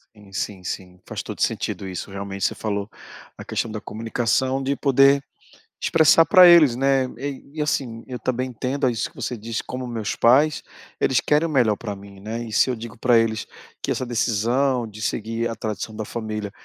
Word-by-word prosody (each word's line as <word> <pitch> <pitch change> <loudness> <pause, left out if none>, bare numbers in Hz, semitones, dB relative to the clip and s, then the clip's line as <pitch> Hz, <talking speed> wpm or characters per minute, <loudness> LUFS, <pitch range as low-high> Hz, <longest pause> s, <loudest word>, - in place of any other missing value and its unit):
Sim, 105 -2 -17
sim, 95 0 -4
sim. 90 0 -6
Faz - - -5
todo - - -7
o - - -8
sentido 95 - -1
isso. 90 0 -6
Realmente 100 -1 -4
você - - 0
falou 100 -1 -3 0.5
a - - -9
questão 115 - -2
da 110 - -4
comunicação, 120 +5 -1
de 140 +1 0
poder 140 0 +4 0.6
expressar 165 0 +5
pra 185 +2 +8
eles, 160 -8 +7
né, 135 0 +2
eh, 140 +1 -5
e 155 - -6
assim, 130 -6 -1
eu 125 -1 -6
também 130 +2 -2
entendo 130 +3 -1
isso 115 -2 -2
que - - -26
você 125 - -3
disse, 115 +1 -4
como 130 0 -6
o - - -6
meus 110 -4 -3
pais, 145 +6 +4 0.4
eles 130 -2 +2
querem 150 +2 +2
o - - -4
melhor 120 -8 +3
pra 105 -2 -5
mim, 100 0 -13
né, 110 +4 -4
e 115 - -7
se 130 - +4
eu - - 0
digo 115 +1 -9
pra 120 0 +4
eles 115 -1 0 0.4
que - - -2
essa 130 - -1
decisão 120 +2 +1
de 105 0 -10
seguir 115 +2 -2
a - - -3
tradição 110 0 -5
da 110 0 -4
família 110 -2 -4
115 Hz, 205 wpm, -23 LUFS, 105-130 Hz, 0.6 s, pra